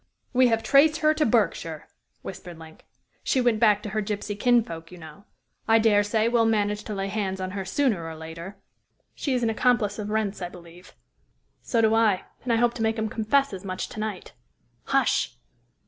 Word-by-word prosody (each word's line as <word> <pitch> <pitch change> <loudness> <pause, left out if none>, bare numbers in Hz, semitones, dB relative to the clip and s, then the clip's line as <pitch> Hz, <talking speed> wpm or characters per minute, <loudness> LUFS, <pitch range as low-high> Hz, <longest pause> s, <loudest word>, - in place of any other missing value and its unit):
"We 255 0 +5
have 225 -1 +1
traced 305 +3 +4
her 310 0 +4
to 310 0 +1
Berkshire," 195 -8 0 0.4
whispered 175 -3 -8
Link. 160 -1 -14 0.4
"She 265 - +1
went 240 -3 +2
back 210 -2 +4
to 210 - -5
her 215 +2 -1
gypsy 205 0 -4
kinsfolk, 205 -8 +1
you 180 - -11
know. 160 +4 -13 0.4
I 225 - +5
dare 215 -2 +4
say 215 +2 +1
we'll 230 -1 +3
manage 210 -1 0
to 210 - -5
lay 195 0 -2
hands 195 -2 -3
on 185 0 -4
her 195 0 -4
sooner 205 -2 0
or 160 - -7
later." 165 +5 -9 0.6
"She 275 -3 -2
is 245 - -1
an 225 - +2
accomplice 220 -3 +1
of 210 0 -4
Wrent's, 210 -2 -1
I 175 - -3
believe." 175 0 -15 0.7
"So 230 - 0
do 220 0 +3
I, 220 -4 +3 0.2
and 245 - -1
I - - +4
hope 235 +1 +2
to 235 - -6
make 220 0 +1
him 220 0 -1
confess 230 +4 +1
as 185 - -7
much 185 -1 -4
to - - -8
night. 215 -3 -5 0.5
Hush!" - - +1
215 Hz, 200 wpm, -25 LUFS, 190-230 Hz, 0.7 s, We